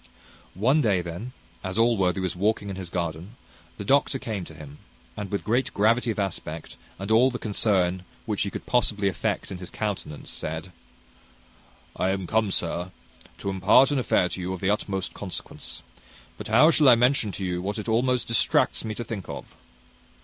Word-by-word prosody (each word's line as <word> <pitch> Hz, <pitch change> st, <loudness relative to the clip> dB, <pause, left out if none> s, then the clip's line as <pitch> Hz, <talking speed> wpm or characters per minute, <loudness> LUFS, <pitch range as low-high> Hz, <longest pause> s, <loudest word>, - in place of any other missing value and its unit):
One 130 Hz, -, +3 dB
day, 100 Hz, -8 st, +2 dB
then, 85 Hz, +9 st, -6 dB, 0.3 s
as 95 Hz, +2 st, -3 dB
Allworthy 105 Hz, -5 st, +3 dB
was 95 Hz, -1 st, -2 dB
walking 100 Hz, +1 st, 0 dB
in -, -, -5 dB
his 95 Hz, -2 st, -6 dB
garden, 85 Hz, +4 st, -4 dB, 0.4 s
the 100 Hz, -, -6 dB
doctor 140 Hz, +3 st, +3 dB
came 110 Hz, -7 st, -4 dB
to 80 Hz, -, -12 dB
him, 75 Hz, -1 st, -11 dB, 0.4 s
and, 105 Hz, -2 st, -5 dB
with 100 Hz, -, -2 dB
great 120 Hz, +4 st, +1 dB
gravity 115 Hz, +4 st, +3 dB
of 110 Hz, -, -1 dB
aspect, 85 Hz, -5 st, -4 dB, 0.2 s
and 95 Hz, +3 st, -5 dB
all 120 Hz, +4 st, +6 dB
the 125 Hz, -, -4 dB
concern 95 Hz, -5 st, +1 dB, 0.2 s
which 105 Hz, -3 st, -1 dB
he 100 Hz, -, 0 dB
could -, -, -7 dB
possibly 105 Hz, -5 st, +1 dB
affect 95 Hz, -6 st, -2 dB
in 90 Hz, -, -5 dB
his 90 Hz, -, -6 dB
countenance, 100 Hz, -8 st, -4 dB
said, 80 Hz, +3 st, -5 dB, 1.2 s
"I 95 Hz, -, +1 dB
am 95 Hz, -1 st, -1 dB
come, 110 Hz, +2 st, +1 dB
sir, 90 Hz, -1 st, -2 dB, 0.5 s
to 100 Hz, -, -4 dB
impart 105 Hz, +9 st, +5 dB
an 145 Hz, -, +2 dB
affair 95 Hz, -7 st, +2 dB
to 95 Hz, -, -5 dB
you 90 Hz, +1 st, -2 dB
of 95 Hz, -, -5 dB
the 95 Hz, +2 st, +1 dB
utmost 95 Hz, -2 st, -2 dB
consequence; 95 Hz, -3 st, -6 dB, 0.5 s
but -, -, -7 dB
how 125 Hz, +9 st, +6 dB
shall 150 Hz, -4 st, +6 dB
I 120 Hz, -, +9 dB
mention 120 Hz, -2 st, +3 dB
to 95 Hz, -, -4 dB
you 90 Hz, -1 st, -2 dB
what 100 Hz, +3 st, -3 dB
it 105 Hz, -, -5 dB
almost 125 Hz, +2 st, +2 dB
distracts 115 Hz, -, +2 dB
me 110 Hz, -1 st, -4 dB
to 120 Hz, -, -4 dB
think 110 Hz, -5 st, -6 dB
of!" -, -, -8 dB
100 Hz, 185 wpm, -26 LUFS, 90-115 Hz, 1.2 s, I